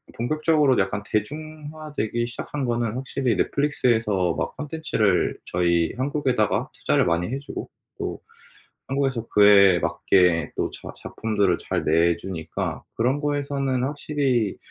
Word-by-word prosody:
본격적으로 150 +1 +2
약간 100 +1 0
대중화되기 150 -1 -3
시작한 130 +4 -4
거는 120 -2 -1
확실히 130 -1 -1
넷플릭스에서 110 - +1
막 - - -3
콘텐츠를 145 - 0
저희 85 -2 +1
한국에다가 130 -5 0
투자를 - - +1
많이 85 +2 0
해 135 - -2
주고 140 - -7 0.3
또 - - -4 0.7
한국에서 135 -4 -1
그에 100 -3 +7
맞게 90 -2 +2
또 - - 0
자 - - -10
작품들을 100 -5 0
잘 - - -2
내 85 +2 +3
주니까 85 -2 -5
그런 130 +5 +1
거에서는 140 -3 -1
확실히 135 -6 0
120 Hz, 305 characters per minute, -24 LUFS, 100-145 Hz, 0.7 s, 그에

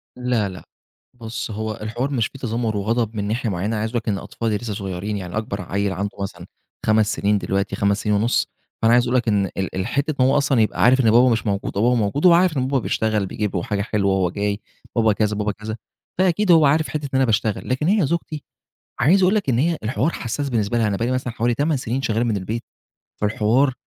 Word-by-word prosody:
لا 125 -5 0
لأ، 90 -1 -10 0.5
بُص، 115 -1 -6
هو 110 +1 -3
الحوار 120 +6 -3
مش 120 -6 +1
في 135 - -13
تذمُّر 115 -3 -2
وغضب 110 +2 -1
من 100 -1 -2
ناحية 115 +2 -1
معيّنة، 100 +4 -2
عايز 110 +1 -1
أقول 120 - -1
لك 115 -1 -3
إن 100 - 0
أطفالي 110 +1 -3
لسّه 115 -1 -5
صغيرين، 100 +1 -4
يعني 90 +1 -5
أكبر 110 -3 -3
عيّل 100 +2 -1
عنده 100 +3 -2
مثلًا 100 - -6 0.4
5 110 0 +3
سنين 105 +1 +1
دلوقتي، 100 0 -1
5 100 +1 +1
سنين 105 -1 +1
ونص، 110 +4 +1 0.3
فأنا 115 +1 +4
عايز 120 - +5
أقول 120 - 0
لك 120 - -1
إن 100 -2 +2
ال 95 0 -4
ال 95 +3 -2
حتّة 140 +4 -1
إن - - +5
هو 135 +2 +3
أصلًا 135 -4 +2
يبقى 110 - +1
عارف 125 +2 +5
إن 115 -3 +4
بابا 125 +3 +6
مش 115 -1 0
موجود 100 -1 -2
وبابا 120 +4 +3
موجود، 115 - 0
هو 175 - +8
عارف 170 -3 +3
إن 130 0 0
بابا 135 0 +1
بيشتغل، 110 -3 0
بيجيب 105 +1 -3
له 85 - -1
حاجة 100 -1 -2
حلوة، 100 -2 0
هو 95 -2 +1
جاي 100 +2 -2 0.4
بابا 110 -2 +3
كذا، 105 0 0
بابا 105 0 -1
كذا، 105 +2 -6 0.4
فأكيد 185 +1 +3
هو 160 -3 +6
عارف 155 +3 +3
حتة 150 -1 -3
إن - - -5
أنا 135 0 +4
باشتغل. 110 -2 -1
لكن 130 +5 0
هي 200 -3 +3
زوجتي، 155 -2 -3 0.6
عايز 175 +10 +4
أقول 185 +3 +4
لك 200 -9 0
إن 120 -2 +2
هي 165 +3 +1
الحوار 130 +8 0
حساس 140 +3 -3
بالنسبة 115 -2 0
لها، 115 -2 +2
أنا 100 - -1
بقي 115 - -1
لي - - -1
مثلًا 130 -2 -2
حوالي 120 +1 +1
8 145 +4 0
سنين 125 +1 -2
شغّال 115 -2 0
من 110 -4 0
البيت، 110 +5 -4 0.6
فالحوار 110 +6 +2
115 Hz, 235 wpm, -21 LUFS, 105-130 Hz, 0.6 s, هو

